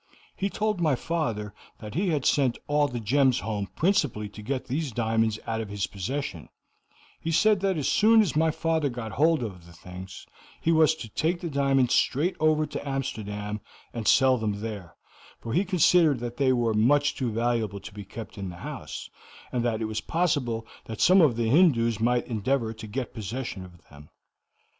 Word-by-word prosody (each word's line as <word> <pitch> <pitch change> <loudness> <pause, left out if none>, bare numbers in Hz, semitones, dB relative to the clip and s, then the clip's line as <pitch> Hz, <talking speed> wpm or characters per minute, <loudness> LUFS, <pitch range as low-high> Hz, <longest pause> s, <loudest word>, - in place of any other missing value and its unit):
He 195 - -1
told 210 -2 -1
my 155 -5 +3
father 115 -10 -3 0.2
that 105 -1 -9
he 190 +4 0
had 150 -5 0
sent 135 -4 +2
all 145 0 +2
the 120 -3 -5
gems 130 +3 +2
home 105 -1 -3
principally 150 - +1
to 105 - -11
get 130 +4 -3
these 140 +2 -2
diamonds 110 -1 0
out 115 0 -2
of 110 - -6
his 100 -1 -2
possession; 100 - -5 0.7
he 165 - -4
said 195 +6 +4
that 190 -2 0
as 145 - -1
soon 220 +1 +5
as 175 -10 -1
my 160 +1 +3
father 160 -1 0
got 120 -3 -6
hold 155 +4 +2
of 90 -6 -7
the 85 - -14
things, 90 +2 -10 0.3
he 165 - +1
was 160 -1 +4
to 145 -8 -8
take 170 - -1
the 170 -3 -5
diamonds 135 -2 +2
straight 155 +8 +2
over 155 0 +3
to 145 -1 -6
Amsterdam 105 -6 -4 0.3
and 115 -3 -4
sell 130 -2 +5
them 105 -2 -2
there, 100 -6 -6 0.4
for 115 - -5
he 185 - +3
considered 175 -5 +4
that 120 0 -6
they 135 -2 +3
were 120 -3 +1
much 145 +7 +3
too 125 -4 -2
valuable 115 -3 -1
to - - -10
be 105 0 -8
kept 110 +2 -9
in 95 -1 -4
the 90 - -8
house, - - -6 0.4
and 120 -2 -1
that 115 -2 -1
it - - 0
was 110 0 -3
possible 140 -10 0 0.2
that 110 -1 -7
some 185 +1 +6
of 145 -8 +4
the 115 -1 0
Hindoos 115 - +4
might 120 +2 +1
endeavor 115 +1 -1
to 110 0 -9
get 125 +3 -4
possession 110 -2 -5
of 85 -2 -16
them. 70 +1 -14
120 Hz, 195 wpm, -26 LUFS, 110-155 Hz, 0.7 s, some